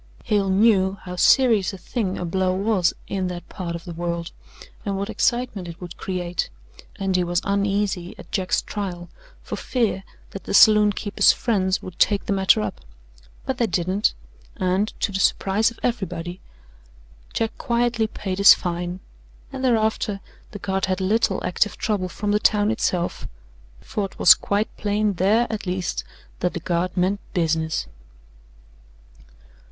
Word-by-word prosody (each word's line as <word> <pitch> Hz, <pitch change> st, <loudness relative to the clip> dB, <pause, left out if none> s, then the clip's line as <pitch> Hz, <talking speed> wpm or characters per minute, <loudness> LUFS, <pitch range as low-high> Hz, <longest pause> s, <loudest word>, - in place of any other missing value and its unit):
Hale 200 Hz, -2 st, +1 dB
knew 195 Hz, -1 st, +3 dB
how 180 Hz, 0 st, -6 dB
serious 220 Hz, 0 st, +4 dB
a -, -, -7 dB
thing 190 Hz, +1 st, -3 dB
a 180 Hz, -, -3 dB
blow 185 Hz, +2 st, 0 dB
was 195 Hz, -3 st, +2 dB, 0.2 s
in 190 Hz, -2 st, -2 dB
that 175 Hz, -1 st, -6 dB
part 170 Hz, -2 st, -5 dB
of 170 Hz, -, -7 dB
the 175 Hz, -, -6 dB
world, 170 Hz, 0 st, -3 dB, 0.5 s
and 200 Hz, -3 st, -2 dB
what 200 Hz, +2 st, -3 dB
excitement 240 Hz, -7 st, 0 dB
it 170 Hz, 0 st, -9 dB
would 175 Hz, -2 st, -8 dB
create, 180 Hz, -2 st, -3 dB, 0.5 s
and 195 Hz, -1 st, -1 dB
he 180 Hz, -, +3 dB
was 175 Hz, 0 st, 0 dB
uneasy 200 Hz, -2 st, -1 dB
at -, -, -13 dB
Jack's 190 Hz, -3 st, 0 dB
trial, 180 Hz, -4 st, -5 dB, 0.3 s
for -, -, -5 dB
fear 225 Hz, -6 st, -1 dB, 0.3 s
that 195 Hz, -, -8 dB
the -, -, -1 dB
saloon 210 Hz, 0 st, +7 dB
keeper's 205 Hz, 0 st, +3 dB
friends 190 Hz, -5 st, 0 dB
would 185 Hz, -, -9 dB
take 205 Hz, -2 st, +3 dB
the -, -, 0 dB
matter 190 Hz, -, +4 dB
up; 105 Hz, -2 st, -4 dB, 0.6 s
but 265 Hz, -1 st, -3 dB
they 235 Hz, -, +2 dB
didn't, 185 Hz, +3 st, 0 dB, 0.4 s
and, 185 Hz, +3 st, +1 dB
to 200 Hz, -, +1 dB
the 190 Hz, -, -2 dB
surprise 200 Hz, +3 st, +2 dB
of 230 Hz, -, -15 dB
everybody, 180 Hz, -7 st, -3 dB, 0.9 s
Jack 225 Hz, -1 st, -2 dB
quietly 235 Hz, -2 st, +1 dB
paid 190 Hz, -3 st, -5 dB
his 200 Hz, -, +9 dB
fine, 175 Hz, +1 st, -4 dB, 0.5 s
and 265 Hz, -1 st, -5 dB
thereafter 220 Hz, -4 st, +1 dB, 0.3 s
the -, -, -8 dB
Guard 190 Hz, -1 st, -1 dB
had 185 Hz, 0 st, -1 dB
little 195 Hz, 0 st, +1 dB
active 205 Hz, +3 st, 0 dB
trouble 205 Hz, -5 st, -1 dB
from 205 Hz, +3 st, -3 dB
the 210 Hz, -, +3 dB
town 210 Hz, 0 st, +3 dB
itself, 180 Hz, -6 st, -1 dB, 0.5 s
for 205 Hz, -, -3 dB
it 195 Hz, -, -10 dB
was -, -, +9 dB
quite 205 Hz, +2 st, -2 dB
plain 210 Hz, 0 st, 0 dB
there, 205 Hz, +6 st, +3 dB
at 210 Hz, -3 st, -4 dB
least, 180 Hz, 0 st, -2 dB, 0.4 s
that 180 Hz, -, -1 dB
the -, -, -2 dB
Guard 175 Hz, +2 st, -2 dB
meant 190 Hz, +3 st, +1 dB, 0.2 s
business. 160 Hz, -2 st, 0 dB
195 Hz, 160 wpm, -23 LUFS, 180-210 Hz, 0.9 s, his